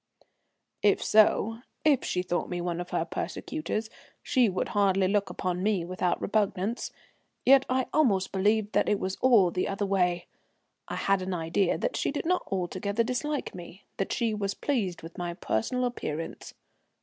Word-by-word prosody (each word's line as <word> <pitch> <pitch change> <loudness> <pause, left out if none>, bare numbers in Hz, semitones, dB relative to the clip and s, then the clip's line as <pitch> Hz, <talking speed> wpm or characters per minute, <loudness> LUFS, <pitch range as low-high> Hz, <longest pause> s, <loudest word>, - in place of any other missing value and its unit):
If 205 -1 +3
so 220 +1 +4 0.3
if 285 -4 +4
she 180 - -1
thought 175 -1 -2
me 175 - -3
one 175 0 -2
of 175 - -7
her - - 0
persecutors 265 -8 -3 0.4
she 255 -6 +3
would 185 - -2
hardly 195 -2 +3
look 200 0 +1
upon 180 0 -2
me 195 -4 +1
without 180 0 -1
repugnance, 210 +1 -1 0.6
yet 270 0 +6
I 255 0 +1
almost 205 -11 +2
believed 210 +2 +1
it 205 - +2
was 190 0 -2
all 220 -9 +5
the 180 - -1
other 200 +1 -1
way. 180 -3 +1 0.6
I - - -4
had 195 -1 +1
an 185 0 -2
idea 170 +3 +1
that - - -2
she - - 0
did 290 - -3
not 360 +2 0
altogether 195 +4 -1
dislike 265 +5 -2
me, 180 +2 -10
that 195 - -2
she 230 -2 0
was 200 -2 -2
pleased 195 - -1
with 165 +3 -9
my 175 -1 -3
personal 195 - -1
appearance. 165 -10 -5
195 Hz, 165 wpm, -28 LUFS, 180-225 Hz, 0.6 s, yet